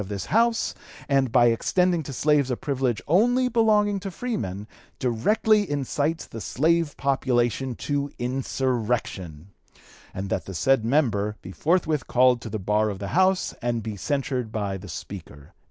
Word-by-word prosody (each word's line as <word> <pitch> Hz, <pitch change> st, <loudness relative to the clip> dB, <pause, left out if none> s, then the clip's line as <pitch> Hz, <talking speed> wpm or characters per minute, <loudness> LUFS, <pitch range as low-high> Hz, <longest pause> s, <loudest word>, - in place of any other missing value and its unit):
272) 105 Hz, 0 st, -6 dB
of -, -, -5 dB
this -, -, -7 dB
House; 230 Hz, 0 st, +2 dB, 0.3 s
and, 135 Hz, -3 st, +2 dB
by 120 Hz, -1 st, +5 dB
extending 175 Hz, +9 st, +2 dB
to 145 Hz, -, -7 dB
slaves 145 Hz, +1 st, +2 dB
a 125 Hz, -, -1 dB
privilege 130 Hz, -5 st, -1 dB
only 245 Hz, -, +3 dB
belonging 215 Hz, -4 st, +2 dB
to 195 Hz, +1 st, -5 dB
freemen, 110 Hz, -, -4 dB, 0.3 s
directly 205 Hz, -, +2 dB
incites 145 Hz, +3 st, -1 dB
the 115 Hz, -, -8 dB
slave 160 Hz, +5 st, +1 dB
population 130 Hz, -2 st, 0 dB
to 145 Hz, +2 st, -2 dB
insurrection; 120 Hz, -, -2 dB, 0.6 s
and 95 Hz, +1 st, -5 dB
that -, -, -1 dB
the 95 Hz, -, -7 dB
said 135 Hz, +8 st, +2 dB
member 110 Hz, -5 st, +1 dB
be 95 Hz, -, -8 dB
forthwith 160 Hz, -, 0 dB
called 125 Hz, -1 st, +4 dB
to 115 Hz, -, -7 dB
the 110 Hz, -, -3 dB
bar 105 Hz, +2 st, +1 dB
of 100 Hz, -, -4 dB
the 100 Hz, 0 st, -5 dB
House 185 Hz, +1 st, +2 dB
and 120 Hz, -2 st, -1 dB
be 110 Hz, -1 st, -4 dB
censured 125 Hz, +3 st, -2 dB
by 100 Hz, -3 st, -2 dB
the 95 Hz, 0 st, -9 dB
Speaker." 75 Hz, -4 st, -9 dB
130 Hz, 160 wpm, -25 LUFS, 110-160 Hz, 0.6 s, by